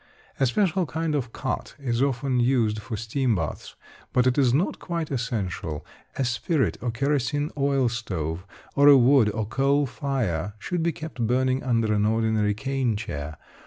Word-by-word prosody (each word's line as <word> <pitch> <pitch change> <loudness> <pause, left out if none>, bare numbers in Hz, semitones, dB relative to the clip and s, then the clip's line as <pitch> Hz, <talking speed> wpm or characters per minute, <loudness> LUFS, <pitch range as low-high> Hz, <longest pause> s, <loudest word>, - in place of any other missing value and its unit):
A 135 - +4
special 185 - +1
kind 160 +3 -2
of 125 -6 -2
cot 130 - -4
is 125 -4 -1
often 135 -1 +1
used 120 -4 +2
for 110 +1 -5
steam 115 +2 0
baths, 80 -6 -4 0.4
but 125 - +3
it 130 -1 +3
is 135 -4 +3
not 150 +10 0
quite 170 -3 -4
essential. 100 - -3 0.3
A 135 - 0
spirit 130 +5 0
or 125 - -1
kerosine 140 +3 0
oil 140 -2 +2
stove, 90 -8 -3 0.3
or 140 +1 +5
a 145 -1 +9
wood 125 -3 +5
or 110 +1 -2
coal 135 +6 +2
fire, 105 - -2
should 175 - -3
be 170 +1 +1
kept 150 -7 -4
burning 130 +2 +1
under 115 -4 +1
an 105 0 +2
ordinary 110 -2 +1
cane 130 +1 -1
chair. 75 -8 -5
125 Hz, 165 wpm, -25 LUFS, 110-140 Hz, 0.4 s, a